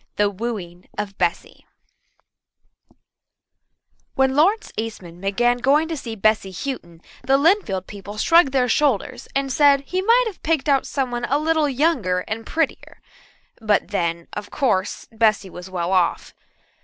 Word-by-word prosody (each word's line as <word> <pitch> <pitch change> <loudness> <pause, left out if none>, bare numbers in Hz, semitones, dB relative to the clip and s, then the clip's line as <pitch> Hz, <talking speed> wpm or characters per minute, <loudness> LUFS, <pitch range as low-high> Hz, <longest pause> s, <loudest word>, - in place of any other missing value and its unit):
The 205 0 +2
Wooing 190 -5 -6
of 205 -1 -4
Bessy 175 -2 -2 2.5
When 265 0 +2
Lawrence 390 +9 +2
Eastman 185 -6 -6
began 240 +5 +1
going 285 +6 +3
to 325 - -2
see 235 -6 -6
Bessy 215 -2 +1
Houghton 175 - -6 0.2
the 270 0 +3
Lynnfield 280 - +2
people 205 +1 -9
shrugged 330 +4 +4
their 260 -2 +2
shoulders 255 -3 0
and 275 -1 0
said 285 -1 +5
he 370 +6 -2
might 465 +5 +4
have 430 -5 -6
picked 315 -2 0
out 275 -2 +2
somebody 245 -3 -2
a 280 - +3
little 310 -1 +1
younger 265 - +1
and 220 +4 -6
prettier 320 -3 -2 0.6
but 210 -2 +1
then, 170 -4 -2
of 205 0 -6
course, 210 -9 -1
Bessy 215 -4 +1
was 180 +1 -9
well 180 -1 -2
off. 180 -3 +1
235 Hz, 145 wpm, -22 LUFS, 195-285 Hz, 2.5 s, said